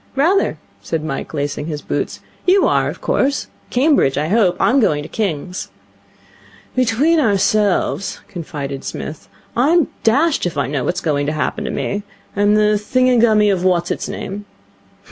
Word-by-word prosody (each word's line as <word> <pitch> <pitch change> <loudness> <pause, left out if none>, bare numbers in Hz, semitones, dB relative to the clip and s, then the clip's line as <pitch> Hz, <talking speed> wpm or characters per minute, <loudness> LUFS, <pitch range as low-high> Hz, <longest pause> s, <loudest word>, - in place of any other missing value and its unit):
'Rather,' 340 +9 +2 0.2
said 160 -2 -3
Mike, 135 -3 -4
lacing 145 0 -3
his 150 -2 -5
boots. - - -3 0.3
'You 380 +2 +5
are, - - +2
of - - -8
course? 280 +1 0 0.2
Cambridge, 260 - +3
I 150 +2 0
hope. 195 -4 +3
I'm 265 +4 +3
going 150 - +2
to - - -7
King's.' 180 -3 -3 1.1
'Between 255 +7 +3
ourselves,' 205 -4 +1
confided 145 -7 -6
Psmith, 155 - -7 0.3
'I'm 300 +5 +3
dashed 280 - +2
if 165 - -6
I 140 - +1
know 135 -1 -2
what's 180 +2 -1
going 145 -4 0
to 150 - 0
happen 155 - -2
to - - -2
me. 205 - -2 0.3
I 200 - -1
am 205 +1 +4
the 210 0 +3
thingummy 225 -3 +3
of 180 -2 -2
what's 175 -2 +1
its - - -3
name.' 205 +2 -6
205 Hz, 160 wpm, -18 LUFS, 155-245 Hz, 1.1 s, You